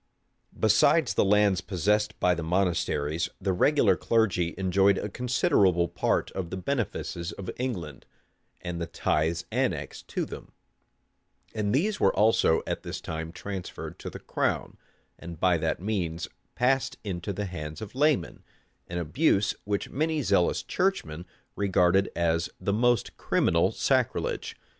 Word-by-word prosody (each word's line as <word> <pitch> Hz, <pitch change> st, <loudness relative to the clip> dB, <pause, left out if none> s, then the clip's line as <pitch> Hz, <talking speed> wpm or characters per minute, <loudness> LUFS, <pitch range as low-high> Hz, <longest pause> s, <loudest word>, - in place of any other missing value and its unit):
Besides 140 Hz, +6 st, +4 dB
the -, -, +3 dB
lands 100 Hz, -1 st, +3 dB
possessed 105 Hz, +3 st, 0 dB
by 90 Hz, -, +3 dB
the 85 Hz, -, -3 dB
monasteries, 85 Hz, -2 st, 0 dB
the 95 Hz, -, 0 dB
regular 145 Hz, +11 st, +4 dB
clergy 100 Hz, -7 st, +1 dB
enjoyed 95 Hz, +1 st, +3 dB
a 105 Hz, -, -3 dB
considerable 100 Hz, -7 st, +2 dB
part -, -, 0 dB
of 90 Hz, -3 st, -4 dB
the 95 Hz, -, -4 dB
benefices 95 Hz, -6 st, -3 dB
of 95 Hz, -, -6 dB
England, 90 Hz, -, -4 dB, 0.5 s
and 90 Hz, -1 st, -4 dB
of -, -, -5 dB
the 85 Hz, -, -3 dB
tithes 80 Hz, +3 st, 0 dB
annexed -, -, -2 dB
to -, -, -2 dB
them; -, -, -10 dB, 1.0 s
and 105 Hz, -2 st, -1 dB
these 200 Hz, -, +1 dB
were -, -, +3 dB
also 105 Hz, -6 st, +3 dB
at -, -, -3 dB
this -, -, -5 dB
time 80 Hz, 0 st, -5 dB
transferred 95 Hz, 0 st, -7 dB
to -, -, -6 dB
the -, -, -8 dB
crown, -, -, -2 dB, 0.4 s
and 85 Hz, -2 st, -9 dB
by 90 Hz, -2 st, +3 dB
that 80 Hz, 0 st, -1 dB
means 90 Hz, -4 st, -2 dB, 0.3 s
passed 130 Hz, +2 st, +1 dB
into 95 Hz, -2 st, -4 dB
the 105 Hz, +1 st, -3 dB
hands 75 Hz, -4 st, -6 dB
of 110 Hz, -1 st, -8 dB
laymen; 140 Hz, -, +1 dB, 0.4 s
an 85 Hz, -, -5 dB
abuse 100 Hz, -, +2 dB
which 100 Hz, -1 st, -2 dB
many 155 Hz, +1 st, 0 dB
zealous 95 Hz, -6 st, +2 dB
churchmen 90 Hz, -, -1 dB, 0.3 s
regarded 95 Hz, -1 st, +3 dB
as 85 Hz, -1 st, +1 dB
the 100 Hz, -, -1 dB
most 120 Hz, 0 st, +1 dB
criminal -, -, +2 dB
sacrilege. -, -, 0 dB
95 Hz, 145 wpm, -27 LUFS, 85-110 Hz, 1.0 s, Besides